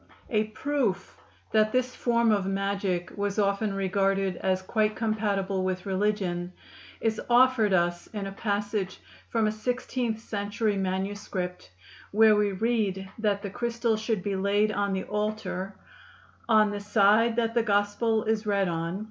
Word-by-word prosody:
A 215 -2 +2
proof 215 -4 -2 0.4
that 215 0 +3
this 255 +1 0
form 235 -2 +2
of 200 -3 +1
magic 195 -2 -1
was 205 0 -2
often 200 +1 +1
regarded 195 0 +1
as 185 0 0
quite 215 +1 +1
compatible 200 -4 -1
with 185 -1 -2
religion 190 -3 -1 0.5
is 220 -1 0
offered 240 -3 +5
us 175 -1 +1
in 205 -2 -5
a 195 - -5
passage 205 -1 -2 0.3
from 225 -2 +1
a 215 - +2
sixteenth 245 +1 -2
century 205 0 -2
manuscript, 190 - -3 0.4
where 215 +1 +6
we 210 -1 +2
read 195 -2 -1
that 205 -2 0
the 200 - -4
crystal 235 +1 0
should 215 -3 -2
be 200 -1 -1
laid 200 +2 +2
on 200 -1 -1
the 190 - -1
altar 210 -2 -3 0.7
"on 215 -2 +5
the 205 - -3
Side 210 +2 +3
that 230 -1 0
the 235 - +3
gospell 210 +1 +1
is 220 -1 -1
read 200 -2 +2
on. 170 +2 -2
205 Hz, 150 wpm, -27 LUFS, 195-220 Hz, 0.7 s, where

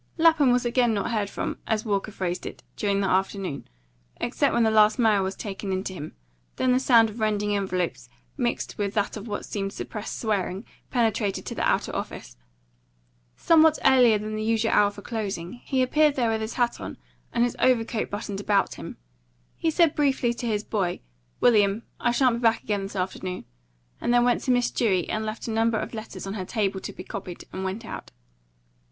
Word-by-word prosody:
Lapham 320 -5 +5
was 245 0 +2
not 240 - 0
again 240 -2 +2
heard 205 0 -1
from, - - -4
as 220 0 0
Walker 205 0 -1
phrased 180 -3 -3
it, - - -9
during 200 -1 0
the 195 - +1
afternoon, 190 -4 -1 0.5
except 275 +3 +1
when 235 - +3
the 220 - +3
last 215 0 +5
mail 220 -5 +4
was 190 0 -2
taken 195 -1 -5
in 190 0 -1
to 190 - -5
him; 155 -4 -8 0.4
then 255 - +2
the 250 - +4
sound 235 -4 +5
of 220 - -10
rending 210 -1 +1
envelopes, 185 -9 -2 0.3
mixed 240 -4 -2
with 200 0 -1
that 205 -1 0
of 215 +1 -7
what 205 -1 -4
seemed 195 -1 -3
suppressed 215 -1 -6
swearing, 200 -2 -1 0.2
penetrated 220 -4 0
to - - -4
the - - -4
outer - - +1
office. - - -6 1.0
Somewhat 320 -1 +5
earlier 250 -5 +6
than 215 +1 -4
the 215 - -3
usual 225 +1 +1
hour 205 - +5
for 205 0 -11
closing, 210 -2 -4
he 265 -2 +1
appeared 300 +3 +3
there 235 -4 +1
with 220 0 -1
his 220 +1 -4
hat 240 -2 0
on - - -6 0.3
and 235 - +2
his 245 - 0
overcoat 230 -3 +2
buttoned 205 -1 -4
about 200 -1 +2
him. - - -8 0.6
He 325 - 0
said 325 -1 +3
briefly 265 -5 +1
to 235 0 -5
his 210 -2 0
boy, 195 -6 -2 0.4
"William, 210 -2 +4 0.2
I 240 - +1
shan't 240 0 +3
be - - -5
back 230 -1 +2
again 205 -2 -1
this 195 +1 -6
afternoon," 185 -1 -3 0.6
and - - 0
then 240 0 +5
went 245 - +2
to 260 - +2
Miss 245 -1 +2
Dewey 190 -7 +1
and 215 - -1
left 215 +2 -5
a - - -2
number 225 0 +2
of - - -4
letters 220 -2 -7
on 195 - -4
her 200 -3 -3
table 195 -2 -1
to - - -6
be - - -9
copied, 190 -5 -7
and 190 - -4
went 195 +5 -4
out. - - -7
215 Hz, 205 wpm, -26 LUFS, 200-240 Hz, 1.0 s, earlier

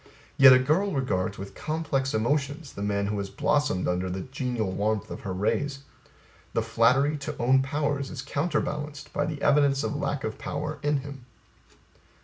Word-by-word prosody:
Yet 135 -1 +9
A 130 - +9
girl 160 +10 +1
regards 100 -7 -1
with 100 +1 -8
complex 145 -5 -2
emotions 140 +5 -1
the - - -7
man 100 0 0
who 105 0 -2
has 100 -1 -4
blossomed 145 -6 +1
under 90 +1 0
the 95 +1 -3
genial 125 -5 -2
warmth 105 +2 -1
of - - -5
her 95 - -5
rays; 135 +9 -1 0.7
the 115 - +1
flattery 125 +6 +3
to 145 +1 -6
own 130 +3 +4
powers 140 0 -1
is 130 -4 -6
counterbalanced 150 0 -2
by 145 - 0
the 150 -2 -4
evidence 140 -1 +4
of - - -2
lack 145 -1 -2
of 110 0 -4
power 150 +1 -4
in 145 -1 +1
him. 135 -3 -10
135 Hz, 170 wpm, -27 LUFS, 110-145 Hz, 0.7 s, Yet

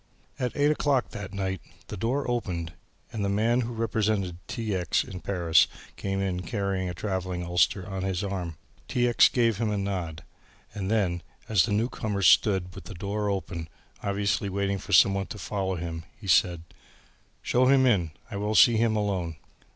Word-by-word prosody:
At 125 -2 -2
eight 145 +1 +4
o'clock 140 -4 +1
that 100 -1 -7
night 95 -3 -3 0.3
the - - -5
door 125 +8 -1
opened 90 -9 -2 0.4
and 110 -3 -2
the 100 - 0
man 115 +5 +2
who 120 0 -3
represented 110 -5 0
T. 110 -3 -3
X. 90 -3 +1
in 90 - -8
Paris 85 -3 +3 0.3
came 95 0 -2
in 95 -2 -1
carrying 95 -1 -2
a 90 - -5
travelling 95 -2 -3
ulster 90 +2 +1
on 95 -1 -4
his 95 0 -1
arm. 90 -5 -4 0.3
T. 125 -1 +1
X. 120 - +6
gave 115 -4 +2
him 115 -2 +1
a 105 - -1
nod 90 -5 -3 0.5
and 100 -3 -3
then, 95 -6 +1 0.3
as 105 -5 +4
the 110 - -4
newcomer 105 -2 -1
stood 90 +1 +4
with - - -10
the 105 - -8
door 100 +3 -2
open, 85 -4 -3 0.3
obviously 100 0 0
waiting 100 0 -1
for 100 - -9
somebody 95 +2 +5
to - - -7
follow 95 -2 -2
him, 85 -1 -5 0.2
he 105 - -12
said, 85 -2 +3 0.8
"Show 125 +1 +3
him 135 0 +5
in 95 -10 +3 0.2
I 100 - -4
will 105 +2 -1
see 115 +1 +7
him 110 -1 +2
alone." 95 -6 -1
100 Hz, 180 wpm, -27 LUFS, 90-110 Hz, 0.8 s, see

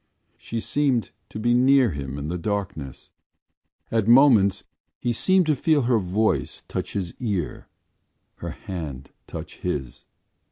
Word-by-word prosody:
She 115 - -5
seemed 130 -3 0 0.2
to - - -8
be 120 +2 +2
near 130 -1 +5
him 70 -2 -5
in 70 +1 -4
the 90 +2 -3
darkness. 90 -9 -4 0.8
At 115 -2 +1
moments 115 -6 +6 0.3
he 120 - -1
seemed 185 +9 +3
to 155 -1 +2
feel 150 +1 +2
her 120 -1 +3
voice 105 +4 0
touch - - -4
his 90 -4 -3
ear, 100 -10 -3 0.7
her - - -6
hand 75 -8 -7 0.2
touch - - -8
his. 70 -9 -4
105 Hz, 135 wpm, -24 LUFS, 85-125 Hz, 0.8 s, moments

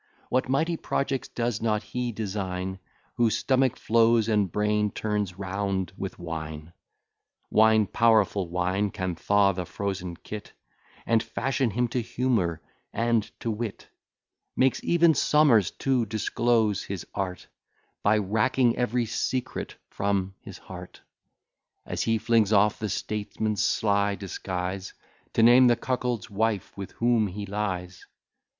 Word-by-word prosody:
What 130 0 0
mighty 160 +5 +1
projects 135 -3 -2
does 120 -2 -2
not 110 -1 0
he 125 +3 -3
design, 95 -3 -4 0.4
Whose 115 -2 +3
stomach 130 -2 +2
flows, 115 -1 +3
and 105 -5 +1
brain 105 +1 +1
turns 105 -3 -2
round 95 -2 -2
with 95 -1 -6
wine? 80 -1 -6 0.8
Wine, 110 0 +5
powerful 105 -4 +2
wine, 90 +4 0
can 95 -2 -3
thaw 100 +4 +3
the 90 -1 -4
frozen 95 -1 -4
cit, 105 -1 -7 0.5
And 115 -1 +3
fashion 130 -1 -1
him 120 +3 0
to 125 +1 -1
humour 115 -9 -1 0.3
and 115 -1 +1
to 115 - -1
wit; 110 -1 -5 0.7
Makes 130 0 +2
even 170 -1 +4
Somers 135 - +4
to 130 -4 +1
disclose 110 0 +1
his 95 -3 -6
art 90 -3 -4 0.5
By 105 +1 +3
racking 110 +4 +2
every 125 0 0
secret 125 +3 -3 0.2
from 100 -1 -1
his - - -10
heart, - - -11 0.9
As - - -3
he 115 -1 +2
flings 110 -2 +2
off 105 0 +3
the 105 - -2
statesman's 105 +1 -2
sly 100 -1 +1
disguise, 95 -1 -5 0.4
To 115 - +3
name 125 +2 +7
the 120 - +5
cuckold's 125 -3 -2
wife 105 -1 -1
with 100 -1 -7
whom 115 -2 +2
he 100 +2 -6
lies. 95 -3 -4
105 Hz, 130 wpm, -26 LUFS, 95-115 Hz, 0.9 s, name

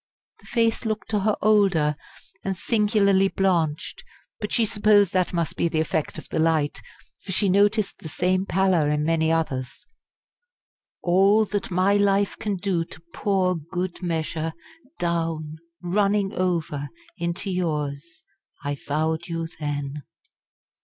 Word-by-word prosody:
The - - -17
face 230 -2 +1
looked 220 -1 -3
to 210 - +2
her 210 +1 +1
older 195 -8 +3 0.5
and 195 -1 -2
singularly 200 -1 +3
blanched; 180 - 0 0.4
but 210 - -4
she 230 - +3
supposed 205 -3 +3
that 185 -1 +2
must 170 -3 -1
be - - +1
the 160 -1 -1
effect 155 -1 -1
of - - -8
the - - -2
light; 160 -2 +1 0.4
for 190 - -7
she 195 +1 +2
noticed 205 +2 +2
the 160 - -8
same 185 +4 0
pallor 185 -5 +2
in 150 0 +1
many 160 0 +2
others. 135 -6 -2 1.2
"All 195 +5 +4
that 205 -1 -3
my 185 +2 +3
life 200 0 +2
can 210 -2 -1
do 180 -2 0
to 165 - -11
pour 190 -3 +1
good 175 +3 -4
measure 160 -2 -2 0.4
down 165 -3 -2 0.3
running 200 +2 +1
over 165 -6 -1 0.3
_into 170 +3 -2
yours, 150 -3 -3 0.4
I 145 0 -2
vowed 160 +3 -1
you 165 -1 -3
then! 145 -1 -3
180 Hz, 140 wpm, -24 LUFS, 160-200 Hz, 1.2 s, All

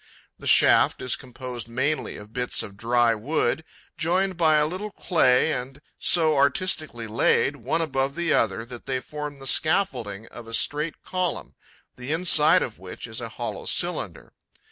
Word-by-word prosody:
The - - -7
shaft - - +5
is 125 - +1
composed 125 -2 -8
mainly 130 +2 -2
of 105 +1 -13
bits 125 0 -1
of 100 - -10
dry 120 +2 +2
wood 145 +7 -1 0.4
joined 185 +3 +1
by 160 -2 +3
a 150 0 +4
little 185 +7 -4
clay 160 -7 +2
and 130 +2 -6 0.2
so 160 -3 +3
artistically 140 -3 0
laid, 115 +5 +1
one 135 +7 -1
above 135 -3 -2
the 170 -2 0
other, 115 +1 +1
that 120 +1 -11
they 130 -1 -1
form 150 +1 -7
the 135 - -12
scaffolding 125 - +1
of 115 - -11
a 115 - -3
straight 150 +5 -1
column, 185 -1 -3 0.4
the 125 +3 -6
inside 160 -2 +5
of 110 - -7
which 95 -1 -9
is 110 0 -5
a 115 - -5
hollow - - -6
cylinder. - - -1
135 Hz, 165 wpm, -24 LUFS, 120-160 Hz, 0.4 s, shaft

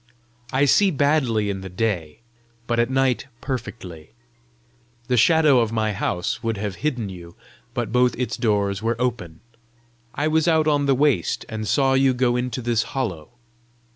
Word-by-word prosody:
I 135 +2 +3
see 195 +8 +4
badly 135 - +1
in 95 -1 -5
the 95 - -7
day, 90 -5 -3 0.4
but 120 0 -1
at 120 +1 +2
night 135 0 +1
perfectly. 115 - -7 1.0
The 125 - +3
shadow 150 +2 +5
of 115 -2 0
my 110 -2 0
house 90 0 -2
would 115 -2 -2
have 100 -2 -4
hidden 125 -9 -2
you, 85 -2 -11 0.4
but 115 -3 -2
both 125 +1 +3
its 125 0 -2
doors 100 -4 0
were 115 +1 -1
open. 120 -10 -3 0.7
I 145 +2 0
was 155 +1 +1
out 160 -2 +3
on 145 -2 +2
the 135 - +4
waste, 135 - +1
and 110 -1 -4
saw 135 +5 +2
you 135 -1 +3
go 125 -1 +1
into 125 0 -3
this 115 -2 +1 0.2
hollow. 95 -12 -3
120 Hz, 165 wpm, -22 LUFS, 105-135 Hz, 1.0 s, shadow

